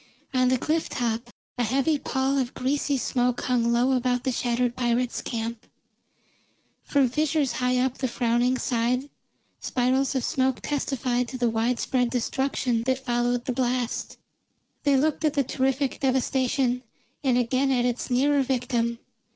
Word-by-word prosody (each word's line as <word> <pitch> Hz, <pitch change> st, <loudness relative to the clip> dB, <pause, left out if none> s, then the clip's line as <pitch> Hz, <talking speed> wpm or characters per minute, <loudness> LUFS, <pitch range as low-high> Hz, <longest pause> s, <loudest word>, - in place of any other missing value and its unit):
On 255 Hz, -1 st, +3 dB
the 255 Hz, 0 st, +3 dB
cliff 315 Hz, +5 st, -1 dB
top 235 Hz, 0 st, -2 dB, 0.3 s
a -, -, +3 dB
heavy 275 Hz, +6 st, +1 dB
pall 265 Hz, +1 st, 0 dB
of 255 Hz, -1 st, -2 dB
greasy 280 Hz, +2 st, 0 dB
smoke 245 Hz, -1 st, 0 dB
hung 235 Hz, -2 st, +1 dB
low 245 Hz, +3 st, +3 dB
about 250 Hz, -1 st, +1 dB
the 260 Hz, -, 0 dB
shattered 240 Hz, 0 st, 0 dB
pirates' 245 Hz, 0 st, 0 dB
camp; 230 Hz, -1 st, -4 dB, 1.1 s
from 280 Hz, -3 st, +2 dB
fissures 300 Hz, +1 st, +1 dB
high 250 Hz, 0 st, 0 dB
up 255 Hz, 0 st, 0 dB
the 260 Hz, -, 0 dB
frowning 240 Hz, +1 st, +1 dB
side 250 Hz, +3 st, 0 dB, 0.5 s
spirals 260 Hz, +2 st, 0 dB
of 260 Hz, -, 0 dB
smoke 265 Hz, -4 st, +1 dB
testified 255 Hz, -4 st, -1 dB
to 255 Hz, -, -6 dB
the 240 Hz, -2 st, +1 dB
wide 230 Hz, +2 st, 0 dB
spread 250 Hz, -2 st, +1 dB
destruction 250 Hz, -1 st, 0 dB
that 260 Hz, 0 st, 0 dB
followed 240 Hz, 0 st, 0 dB
the 255 Hz, -, -1 dB
blast. 245 Hz, -1 st, -1 dB, 0.7 s
They 280 Hz, -1 st, +4 dB
looked 305 Hz, +3 st, +1 dB
at 305 Hz, -2 st, +2 dB
the 280 Hz, -, +3 dB
terrific 265 Hz, +2 st, -1 dB
devastation, 260 Hz, -1 st, +1 dB, 0.4 s
and 255 Hz, -3 st, +3 dB
again 255 Hz, +3 st, +1 dB
at 245 Hz, -2 st, +2 dB
its 245 Hz, 0 st, -2 dB
nearer 280 Hz, +3 st, +3 dB
victim. 240 Hz, -3 st, 0 dB
255 Hz, 150 wpm, -26 LUFS, 240-270 Hz, 1.1 s, They